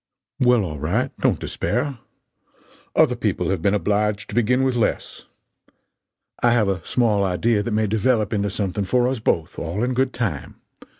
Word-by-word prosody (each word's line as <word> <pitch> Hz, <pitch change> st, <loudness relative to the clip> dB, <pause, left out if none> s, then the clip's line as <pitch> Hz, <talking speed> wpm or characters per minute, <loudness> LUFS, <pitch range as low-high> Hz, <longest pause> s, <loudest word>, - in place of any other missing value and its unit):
"Well, 125 Hz, -4 st, +4 dB
all 75 Hz, -4 st, -6 dB
right 110 Hz, -, -1 dB
don't -, -, +2 dB
despair. 135 Hz, 0 st, -2 dB, 1.0 s
Other -, -, +4 dB
people -, -, -1 dB
have 95 Hz, -4 st, -1 dB
been 100 Hz, +4 st, +2 dB
obliged 105 Hz, 0 st, 0 dB
to -, -, -8 dB
begin 125 Hz, +2 st, +2 dB
with 130 Hz, -2 st, +1 dB
less. 115 Hz, -, -2 dB, 1.2 s
I 120 Hz, -1 st, +4 dB
have 115 Hz, -4 st, +2 dB
a 95 Hz, -4 st, -2 dB
small 110 Hz, -2 st, +1 dB
idea 105 Hz, +4 st, +1 dB
that 105 Hz, -, -3 dB
may 110 Hz, 0 st, +1 dB
develop 110 Hz, +1 st, +1 dB
into 100 Hz, -1 st, 0 dB
something 100 Hz, 0 st, -2 dB
for 125 Hz, +5 st, +2 dB
us 130 Hz, -1 st, -1 dB
both, 80 Hz, -6 st, -1 dB
all 85 Hz, +7 st, -3 dB
in 125 Hz, +1 st, 0 dB
good 130 Hz, +1 st, +1 dB
time. 100 Hz, -, -3 dB
105 Hz, 170 wpm, -22 LUFS, 100-120 Hz, 1.2 s, Well